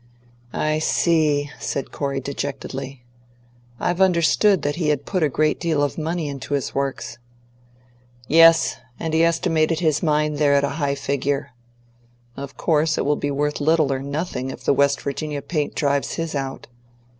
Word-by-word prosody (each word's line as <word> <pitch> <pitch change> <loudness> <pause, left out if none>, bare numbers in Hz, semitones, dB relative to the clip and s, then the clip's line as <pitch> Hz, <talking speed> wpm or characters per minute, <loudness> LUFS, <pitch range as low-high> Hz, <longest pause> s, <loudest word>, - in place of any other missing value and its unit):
"I 155 0 0
see," 155 -3 +2
said 140 - -3
Corey 140 -1 -2
dejectedly. 135 -1 -5 0.8
"I've 175 +1 -1
understood 185 +1 +3
that 145 +1 -1
he 165 -3 -1
had 145 -2 0
put 185 -3 -1
a 155 - +3
great 155 +3 +1
deal 160 -4 +1
of 145 - -1
money 160 0 -2
into 140 0 -4
his 140 - -3
Works." 135 -3 -3 1.1
"Yes, 165 +1 +6 0.2
and 160 -1 -3
he 160 +1 +4
estimated 165 -1 +1
his 155 -4 +1
mine 150 -2 +1
there 145 -1 +3
at 140 - +3
a 140 - +1
high 140 -1 +1
figure. 140 0 -2 0.8
Of 140 0 -8
course 155 -1 +1
it - - 0
will 145 +1 +2
be 145 - -2
worth 150 +1 -1
little 155 -1 +3
or 135 - -2
nothing 140 -1 -4
if - - -8
the - - +3
West 140 0 +2
Virginia 145 0 -4
paint 150 -4 -2
drives 140 -2 0
his 165 -1 -3
out. 135 -2 -4
145 Hz, 165 wpm, -22 LUFS, 140-160 Hz, 1.1 s, Yes